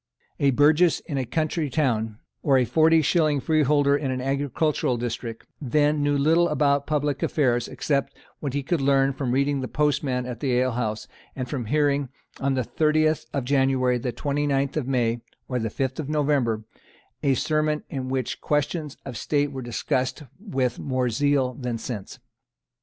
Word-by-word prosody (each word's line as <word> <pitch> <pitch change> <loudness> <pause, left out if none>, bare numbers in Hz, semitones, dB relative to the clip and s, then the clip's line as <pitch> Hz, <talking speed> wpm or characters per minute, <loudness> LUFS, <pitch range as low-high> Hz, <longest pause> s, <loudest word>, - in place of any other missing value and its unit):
A 140 - +4
burgess 150 +5 +4
in 140 -4 -4
a 130 - -3
country 155 0 -1
town, 115 -7 0 0.2
or 135 -2 +3
a 125 - +3
forty 160 +4 +4
shilling 155 -1 +2
freeholder 145 -1 +3
in 145 -2 -2
an 130 0 -2
agricultural 140 0 0
district, 115 -1 -5 0.2
then 150 +2 +2
knew 145 0 +2
little 165 +4 +3
about 140 -2 +1
public 145 -2 0
affairs 120 -5 +1
except 140 -2 -2 0.2
what 140 -2 -4
he 140 - -1
could 160 +2 0
learn 135 0 +3
from 130 -2 -2
reading 140 +1 +1
the 130 - -3
Postman 135 -4 0
at 125 -2 -6
the 130 -3 +1
alehouse, 115 -4 -1 0.3
and 130 -2 -4
from 125 -2 -3
hearing, 145 +1 +1 0.3
on 135 0 0
the 130 - 0
30th 155 0 +1
of 135 -3 -2
January, 130 -2 +2
the 125 +1 -2
29th 140 +1 -1
of 150 -5 -1
May 120 -3 +1 0.3
or 125 -1 -1
the 110 -1 -2
5th 130 +5 -3
of 150 -2 -4
November, 140 -7 +1 0.6
a 135 -2 +2
sermon 155 +1 0
in 130 -2 -4
which 130 -2 -2
questions 150 0 -1
of 130 -3 -6
state 145 +5 0
were 135 -1 -5
discussed 125 +3 -2 0.2
with 130 - -2
more 130 -2 -1
zeal 135 +1 +1
than 125 -2 -4
sense. 110 -4 -6
140 Hz, 170 wpm, -25 LUFS, 125-150 Hz, 0.6 s, A